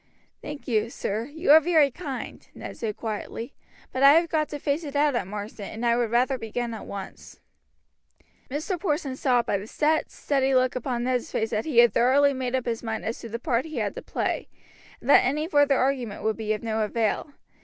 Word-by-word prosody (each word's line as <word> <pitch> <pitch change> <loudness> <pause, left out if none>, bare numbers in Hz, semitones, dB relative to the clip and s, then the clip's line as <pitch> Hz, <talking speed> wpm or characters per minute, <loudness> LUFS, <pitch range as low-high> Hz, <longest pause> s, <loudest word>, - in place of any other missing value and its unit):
"Thank 295 -1 -8
you, 220 -2 +1
sir, 220 -1 -3
you 300 +3 0
are 310 - +10
very 315 -3 +3
kind," 275 -3 -7
Ned - - -8
said 215 -3 -4
quietly; 225 +3 -5 0.4
"but 260 - -3
I 275 +1 +9
have 335 +1 +3
got 305 -1 0
to 295 - -5
face 290 +3 -1
it 290 -2 -7
out 290 0 +3
at 240 -7 -1
Marsden, 205 0 -6
and 225 +2 -5
I 235 0 +4
would 240 -1 0
rather 250 +3 +1
begin 230 +1 -3
at 220 - -8
once." 195 -1 -9 1.1
Mr. 310 +7 -3
Porson 300 -6 -1
saw 250 -3 +2
by 200 - -1
the 200 - -9
set, 310 +5 +1
steady 270 -2 0
look 255 0 +2
upon 245 -1 -2
Ned's 250 -1 -1
face 220 0 -1
that 215 - -1
he 300 -7 -3
had 240 0 +7
thoroughly 280 +4 +4
made 260 -1 -2
up 255 - -1
his 230 -2 -2
mind 225 -2 -4
as 225 - -3
to 230 - -8
the 230 - -3
part 240 +2 0
he 310 -4 -7
had 210 -3 -1
to - - -7
play, - - -2 0.5
and - - -12
that 285 - +7
any 300 +4 0
further 290 -4 +4
argument 255 -5 -1
would 220 0 +1
be 220 -1 -3
of 210 - -5
no 220 -1 -1
avail. 225 +6 -1
255 Hz, 220 wpm, -26 LUFS, 225-285 Hz, 1.1 s, are